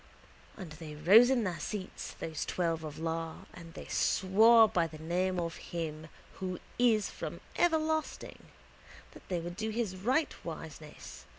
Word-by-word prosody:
And 180 -7 -8
they 155 0 -9
rose 200 +11 +7
in 255 -3 +2
their 185 -4 -2
seats, 200 -3 -5
those 160 -2 -3
twelve 165 -3 -1
of 150 -2 -6
Iar, 165 0 -4
and 165 -1 -12
they - - -8
swore 220 +4 +5
by 170 -5 +1
the 155 - -11
name 180 +3 -1
of 165 -1 -3
Him 160 -2 -5 0.3
Who 185 -2 -3 0.2
is 225 -4 +3
from - - -6 0.2
everlasting 315 -2 0 0.7
that - - -16
they 180 -2 0
would 175 +1 -6
do 220 +3 -3
His 220 -4 -2
rightwiseness. 170 - -4
180 Hz, 150 wpm, -31 LUFS, 165-220 Hz, 0.7 s, rose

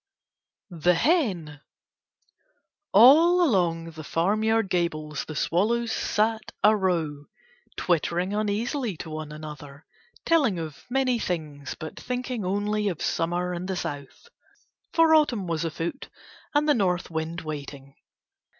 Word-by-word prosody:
THE 180 +2 +4
HEN 185 - +1 1.3
All 325 - +7
along 165 - 0
the 155 -1 -9
farmyard 215 +7 +1
gables 155 -4 -2
the 155 - -7
swallows 225 +10 +1
sat 220 +1 0
a 215 +1 +6
row, 165 -7 -1 0.5
twittering 175 +2 0
uneasily 215 - -1
to 160 - -7
one 155 -1 -6
another, 150 -1 -10 0.4
telling 280 - +3
of 155 -3 -7
many 255 -2 +1
things, 150 -8 -4
but 155 - -7
thinking 250 -2 -3
only 205 +2 0
of 175 -6 -2
Summer 175 +2 -1
and 175 +1 -4
the 190 - -2
South, 145 - -6 0.6
for 330 -1 +4
Autumn 260 -11 +3
was 165 -2 -2
afoot 165 - -4 0.5
and 295 +1 +3
the 295 - +5
North 180 -7 0
wind 160 +2 -3
waiting. 140 -3 -7
180 Hz, 125 wpm, -26 LUFS, 160-225 Hz, 1.3 s, All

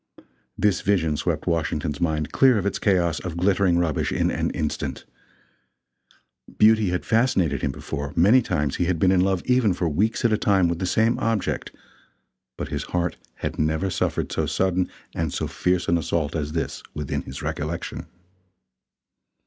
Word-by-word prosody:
This 105 -3 +2
vision 85 -6 +1
swept - - -2
Washington's 75 -3 -1
mind 80 -3 0
clear 130 -4 +5
of 100 - -2
its 100 - -1
chaos 85 -6 +2
of 85 -2 -6
glittering 95 -1 +2
rubbish 85 -4 0
in - - +1
an - - -1
instant. 75 - -3 1.5
Beauty 110 -2 +5
had 90 0 -2
fascinated 95 - +2
him 70 - 0
before; 70 +1 -5
many 105 +9 +5
times 75 - -1
he 90 - +1
had 90 -1 0
been 90 +3 +3
in 95 -1 +4
love 95 -1 +1
even 125 -7 +3
for 90 - -1
weeks 105 +11 0
at 115 - +4
a 110 - +1
time 95 -3 +3
with 85 0 -2
the 95 - -1
same 110 +5 +2
object 115 -3 -1 0.9
but - - -4
his - - -3
heart 90 0 -2 0.2
had - - -5
never 80 +5 0
suffered - - -1
so - - -1
sudden 95 -1 0 0.2
and 80 -2 -2
so - - -2
fierce 90 0 0
an 85 0 +3
assault 80 -1 -1
as 75 -1 -3
this, 80 - -3
within 75 -2 -3
his 65 - -8
recollection. 80 +3 -4
90 Hz, 170 wpm, -24 LUFS, 80-100 Hz, 1.5 s, clear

